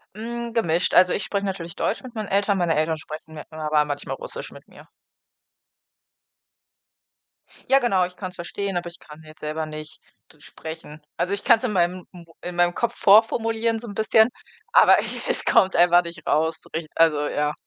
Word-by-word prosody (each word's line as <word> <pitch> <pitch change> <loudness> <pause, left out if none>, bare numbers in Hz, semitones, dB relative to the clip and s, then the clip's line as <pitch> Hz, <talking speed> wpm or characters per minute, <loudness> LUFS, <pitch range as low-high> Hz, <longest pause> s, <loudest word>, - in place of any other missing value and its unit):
Hm, 235 +1 -5
gemischt, 175 -7 0
also, 180 0 +6
ich 195 - -1
spreche 200 0 -2
natürlich 175 -4 -5
Deutsch 225 - -2
mit 250 -2 -10
meinen 215 -3 -5
Eltern, 200 0 +1
meine 170 -2 +1
Eltern 155 +1 0
sprechen 155 0 -10
mit 150 - -10
mir 155 - -11
aber 150 -1 +2
manchmal 145 0 -4
Russisch - - -7
mit - - -15
mir. - - -16 2.8
Ja 270 0 +6
genau, 195 -7 +2
ich 180 0 -11
kann's 185 -2 -7
verstehen, 195 +3 -4
aber 175 - -4
ich 170 - -12
kann 150 +1 -14
jetzt 155 0 -15
selber 155 +1 -4
nicht 155 0 -9 0.3
d 150 - -25
sprechen. 160 -1 -10 0.2
Also, 185 - -1
ich 200 - -3
kann's 235 0 +5
in 240 - -1
meinem 180 -1 0
m 175 -2 -13 0.2
in 180 0 -6
meinem 175 0 +3
Kopf 235 0 -1
vorformulieren 225 +2 +3
so 235 - -9
'n 205 - -7
bisschen, 220 +2 +4 0.4
aber - - +7
ich - - -4
es - - +1
kommt 190 -5 +3
einfach 175 +1 +5
nicht 170 -2 -10
raus, 160 +1 0
rich 160 -1 -3
also, 155 -3 +3
ja. 150 0 -1
175 Hz, 190 wpm, -23 LUFS, 160-215 Hz, 2.8 s, aber